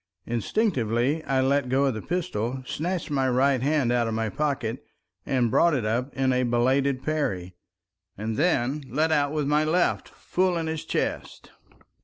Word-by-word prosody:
Instinctively 120 - 0
I 135 -1 +1
let 135 0 +1
go 135 +2 +2
of 135 - +1
the 110 - -5
pistol, 130 - -3
snatched 170 +4 -3
my 135 -2 +1
right 130 +1 +2
hand 140 -3 +1
out 120 -1 +1
of 110 - -2
my 110 -1 -1
pocket 135 -3 -2 0.4
and 125 -4 +1
brought 170 +5 +4
it 120 -5 -1
up 120 +5 -1
in 135 -1 +1
a 125 - +2
belated 130 +2 +1
parry, 100 - -2 0.6
and 110 +2 -3
then 145 -2 +1
let 155 +5 +1
out 145 -2 +2
with 150 -2 -1
my 150 +2 +2
left 170 +3 +1
full 185 -1 -1
in 165 - -2
his 160 -1 -4
chest. - - -3
135 Hz, 170 wpm, -26 LUFS, 120-150 Hz, 0.6 s, brought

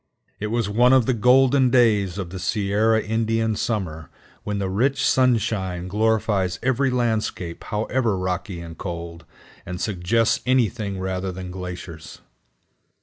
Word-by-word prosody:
It 105 - -2
was 115 -1 -1
one 120 +5 +4
of 130 -3 +5
the 130 - +2
golden 130 +3 +4
days 105 -7 +3
of 90 -4 -5
the 95 - -6
Sierra 105 +3 +1
Indian 110 0 0
summer, 80 - -3 0.3
when 105 -1 -3
the 100 -1 -1
rich 130 +8 +1
sunshine 105 -8 +1
glorifies 105 -3 +1
every 130 +2 +2
landscape 110 -8 -2
however 110 0 -1
rocky 95 0 -3
and 85 -1 -9
cold, 85 -2 -7 0.4
and 90 0 -6
suggests 105 +3 +1
anything 115 -5 0
rather 95 0 -3
than 90 0 -7
glaciers. 90 -3 -8
105 Hz, 135 wpm, -23 LUFS, 90-115 Hz, 0.4 s, of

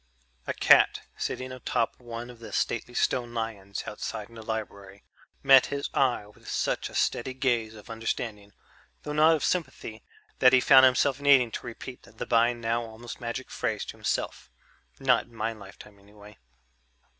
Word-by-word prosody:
A - - -1
cat - - +5
sitting 130 0 -4
atop 125 -2 -2
one 120 0 -7
of 120 - -16
the 110 -2 -10
stately 120 +3 -2
stone 120 -1 0
lions 105 -4 -4
outside 105 0 -6
the 115 -1 -10
library 100 -3 -6 0.4
met 135 -1 +7
his 140 0 -4
eye 125 -6 +1
with 105 - -19
such - - -1
a - - -12
steady 130 +2 0
gaze 120 -4 0
of 105 - -13
understanding, 115 -2 -4 0.5
though 150 - -4
not 155 +2 +5
of 155 - -4
sympathy, 130 - -3 0.4
that 125 - +6
he 130 - +7
found 130 +1 +7
himself 135 +2 +1
needing 135 -5 +5
to - - -6
repeat 125 +2 -8
the - - -8
by 115 0 +3
now 115 0 -2
almost 115 +1 -9
magic 120 +2 -5
phrase - - -2
to - - -8
himself: - - -3 0.5
"Not 135 -2 +3
in 120 - -20
my 115 0 -2
lifetime 100 -1 -14
anyway." 105 0 -16
115 Hz, 165 wpm, -27 LUFS, 110-130 Hz, 0.5 s, met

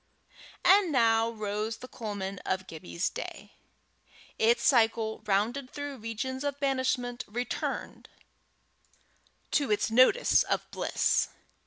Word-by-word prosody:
And 380 -2 +6
now 230 -3 +3
rose 215 0 -3
the 255 - -10
culmen 200 -5 -5
of 190 0 -2
Gibbie's 85 - -4
day! - - -7 0.9
its 235 +2 +3
cycle, 225 -4 +2
rounded 230 +7 0
through 285 -1 -6
regions 250 +4 -4
of 285 -1 -3
banishment, 260 -3 0
returned 240 +4 -4 1.4
to 285 -4 +1
its 210 +1 +1
nodus 255 - +5
of - - -1
bliss. - - +1
230 Hz, 110 wpm, -29 LUFS, 215-260 Hz, 1.4 s, And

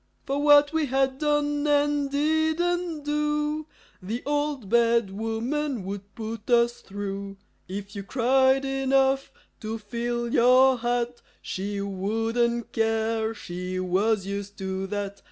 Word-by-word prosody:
For 275 +1 -1
what 290 0 +6
we 320 -2 +1
had 265 0 +1
done 295 -1 +1
and 290 -1 +2
didn't 315 +3 0
do 300 +1 -1 0.3
The 220 +7 -4
Old 290 -5 -1
Bad 235 -1 +3
Woman 225 +4 -2
would 200 +1 -7
put 225 -1 -6
us 240 0 +3
through. 195 0 -6 0.3
If 200 +2 -7
you 200 - -4
cried 265 +4 +3
enough 270 0 +1 0.3
to 220 0 -4
fill 235 +2 -3
your 255 +1 +5
hat, 240 0 -1 0.2
She 200 +2 -4
wouldn't 225 +5 -1
care; 225 0 0
she 180 -1 -5
was 190 +3 +1
used 200 0 -5
to 190 0 -3
that. 200 0 -4
235 Hz, 125 wpm, -26 LUFS, 205-285 Hz, 0.3 s, what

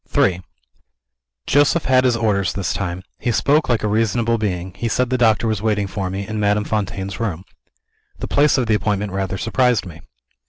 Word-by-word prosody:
III 90 -2 +3 1.0
Joseph 145 +4 +3
had 130 0 +3
his 120 -2 +2
orders, 100 -5 0
this 100 -4 -2
time. 90 -1 -4 0.2
He 120 - -1
spoke 145 +6 +2
like 120 -3 +1
a - - +1
reasonable 115 +2 +1
being 90 -4 -3
he 115 +5 -3
said 125 +2 0
the - - +2
doctor 115 -1 +3
was 110 -3 -1
waiting 105 -2 0
for 95 -1 -4
me, 95 +2 -4
in 110 -1 -4
Madame 105 0 +2
Fontaine's 100 -2 -3
room. 95 -7 -3 0.7
The - - -5
place 145 0 +3
of 130 - +1
the 110 - +1
appointment 105 -1 -1
rather 95 0 -2
surprised 120 +1 +1
me. 85 -2 -11
105 Hz, 190 wpm, -20 LUFS, 95-115 Hz, 1.0 s, III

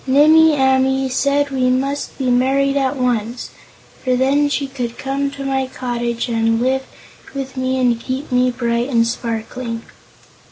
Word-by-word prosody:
Nimmie 310 +4 +6
Amee 265 0 +2
said 280 +2 +1
we 255 -1 +1
must 275 +3 -1
be 255 -2 0
married 270 +3 +2
at 270 0 +1
once, 245 -2 -2 0.5
for 255 -1 +1
then 280 +3 +2
she 285 0 -1
could 250 -3 -5
come 275 +1 -2
to 275 0 -7
my 265 -1 0
cottage 240 -2 -3
and 225 -1 +1
live 265 +2 0 0.5
with 270 -1 -5
me 260 0 -1
and 245 -2 +2
keep 265 +3 -4
me 250 0 +3
bright 240 0 -1
and 230 -3 +3
sparkling. 230 0 -4
260 Hz, 155 wpm, -18 LUFS, 240-275 Hz, 0.5 s, Nimmie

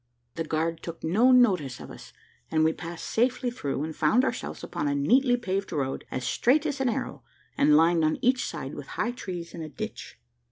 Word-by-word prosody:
The 165 - -3
guard 160 +1 -1
took 170 -1 -8
no 215 +11 +4
notice 185 - +3
of - - -9
us, - - -12 0.4
and 155 - +2
we 160 0 +3
passed 170 0 -7
safely 245 +1 +1
through, 145 - -3
and 160 0 -5
found 220 - +3
ourselves - - -4
upon 145 - -3
a 145 - 0
neatly 245 - +3
paved 195 -4 -3
road, 140 -5 -2
as 130 -1 -4
straight 280 - +2
as 285 -3 -2
an 260 - +2
arrow, - - -4 0.3
and 150 0 +5
lined 165 +1 +4
on 155 0 +2
each 255 0 +2
side - - -5
with - - -8
high 240 - 0
trees 180 -8 -7
and 165 - -7
a 155 - -7
ditch. - - -7
170 Hz, 205 wpm, -27 LUFS, 155-245 Hz, 0.4 s, and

